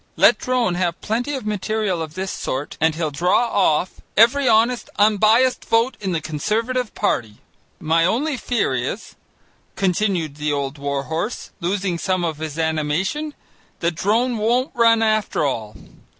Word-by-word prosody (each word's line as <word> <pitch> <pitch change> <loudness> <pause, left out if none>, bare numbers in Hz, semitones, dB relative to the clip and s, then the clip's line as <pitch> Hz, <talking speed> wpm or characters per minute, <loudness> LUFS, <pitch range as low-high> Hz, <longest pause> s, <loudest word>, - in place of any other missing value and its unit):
Let 230 - +5
Drone 250 -7 0
have 175 -1 -1
plenty 245 +7 -2
of 260 - -6
material 210 -3 -1
of 155 -1 -6
this 190 0 -3
sort 135 +3 -4
and 160 -1 +3
he'll 160 -2 -2
draw 180 +10 +2
off 180 -2 +1 0.2
every 250 +5 +5
honest 230 +2 +2
unbiased 215 +5 +3
vote 230 +3 +2
in 195 -2 -2
the 165 - 0
Conservative 220 - -2
party. 110 - -1 0.4
"My 165 +1 +2
only 265 - +1
fear 245 0 -1
is," - - -4 0.6
continued 180 -5 0
the 150 0 -1
old 140 0 -3
war 140 -1 -2
horse, 165 - -4
losing 185 0 -1
some 185 -1 0
of 160 -3 -3
his 155 -1 -5
animation, 165 - -1 0.5
"that 170 0 +1
Drone 225 +8 +1
won't 245 +5 +1
run 230 -1 +4
after 215 -7 +1
all. 110 -6 -3
190 Hz, 150 wpm, -21 LUFS, 160-230 Hz, 0.6 s, Let